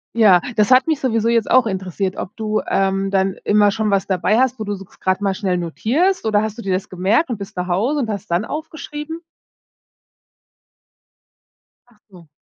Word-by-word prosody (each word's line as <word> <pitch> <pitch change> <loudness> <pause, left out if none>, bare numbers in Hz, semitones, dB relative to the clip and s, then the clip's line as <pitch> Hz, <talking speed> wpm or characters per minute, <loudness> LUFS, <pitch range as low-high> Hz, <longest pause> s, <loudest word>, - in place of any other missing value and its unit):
Ja. 205 -6 +6 0.2
Das 210 +3 +3
hat 255 +3 +5
mich 315 -3 +1
sowieso 230 -3 0
jetzt 230 -2 +1
auch 255 -1 +5
interessiert, 190 -1 -3
ob 185 - -6
du, 215 -1 -1
ähm, 195 0 0
dann 190 0 +1
immer 205 -1 +4
schon 215 +1 -1
was 195 -1 +1
dabei 185 +3 +1
hast, 260 -1 +1
wo - - -2
du 205 - -2
so 195 - -10
gr - - -24
grad 185 +1 0
mal 200 -1 +1
schnell 190 -2 -1
notierst 255 - 0
oder 210 -1 +2
hast 220 0 -4
du - - -6
dir 195 -4 -2
das 185 +1 -3
gemerkt 195 - +1
und 235 - -2
bist 200 +2 -9
nach 180 0 -3
Hause 225 +12 0
und 240 -5 -2
hast 200 -3 -4
dann 175 +4 +1
aufgeschrieben? 315 +1 -6 2.7
Ach 240 -3 -26
so. 175 -4 -16
210 Hz, 200 wpm, -19 LUFS, 190-235 Hz, 2.7 s, Ja